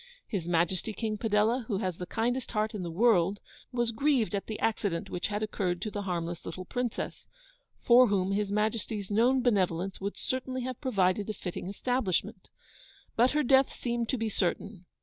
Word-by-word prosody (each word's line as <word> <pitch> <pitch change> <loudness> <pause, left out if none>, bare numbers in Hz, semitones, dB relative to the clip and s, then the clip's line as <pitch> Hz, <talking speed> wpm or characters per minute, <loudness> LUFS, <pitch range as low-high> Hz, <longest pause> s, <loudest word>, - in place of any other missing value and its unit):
'His 185 -6 -3
Majesty 175 +5 +1
King 215 -1 -3
Padella, 220 +3 +2
who 205 - 0
has 185 -4 -2
the 180 - -5
kindest 240 +3 -1
heart 215 0 0
in 210 - -4
the 175 - -4
world, 195 0 +3 0.3
was 240 -2 0
grieved 250 -2 +1
at 200 - -2
the 220 - -4
accident 200 -6 -1
which 175 - -2
had 210 0 -2
occurred 185 -4 -1
to 215 - -3
the 205 - -3
harmless 175 -3 -3
little 185 - -6
Princess, 245 +3 -3 0.5
for 250 +1 +6
whom 195 -2 +1
His 200 0 0
Majesty's 210 -1 -1
known 245 +5 +3
benevolence 190 -5 +1
would 200 +1 -3
certainly 260 0 -3
have 255 -1 -5
provided 205 -6 +1
a - - -1
fitting 180 -2 -5
establishment. 200 -5 -1 0.7
But 245 +4 +4
her 300 0 +2
death 265 +1 +4
seemed 235 -1 -2
to 260 - +1
be 225 -1 -1
certain. 195 -1 -2
210 Hz, 180 wpm, -29 LUFS, 185-240 Hz, 0.7 s, for